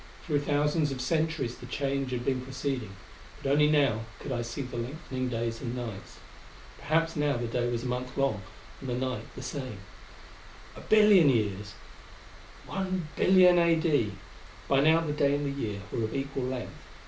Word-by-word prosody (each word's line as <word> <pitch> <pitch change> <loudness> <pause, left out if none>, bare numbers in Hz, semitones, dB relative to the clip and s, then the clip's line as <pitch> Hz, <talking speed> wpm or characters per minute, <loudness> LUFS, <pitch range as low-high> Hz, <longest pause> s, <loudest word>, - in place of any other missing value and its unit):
Through 150 -4 +1
thousands 145 +1 +1
of 135 - -4
centuries 155 -1 0
the 125 - -9
change 135 0 -1
had 125 -1 -3
been 130 -2 0
proceeding, 130 -5 -4 0.5
but 135 - 0
only 150 +1 +5
now 140 -7 +2
could 140 - -6
I 120 -2 -1
see 120 +4 -4
the 125 -1 -8
lengthening 130 +1 -4
days 115 -1 -2
and 125 -2 -4
nights. 115 -6 -7 0.6
Perhaps 165 +3 +1
now 145 -3 +1
the 120 - -2
day 120 +1 -1
was 120 -1 -2
a - - -5
month 125 0 -3
long, 135 -7 +1 0.4
and 135 - -6
the 120 - -1
night 130 0 -2
the 130 - -7
same. 130 -4 -5 1.0
A - - -9
billion 210 -7 +6
years! 105 -4 0 0.9
1,000,000,000 185 -1 +3
A.D.! 160 - +2 0.5
By 135 - +3
now 160 +3 +5
the 155 -3 -2
day 140 -1 +2
and 145 0 -2
the 140 0 -3
year 105 -2 -3
were 115 - -1
of 110 - -5
equal 135 -1 -2
length. 130 -1 -4
135 Hz, 170 wpm, -29 LUFS, 120-150 Hz, 1.0 s, billion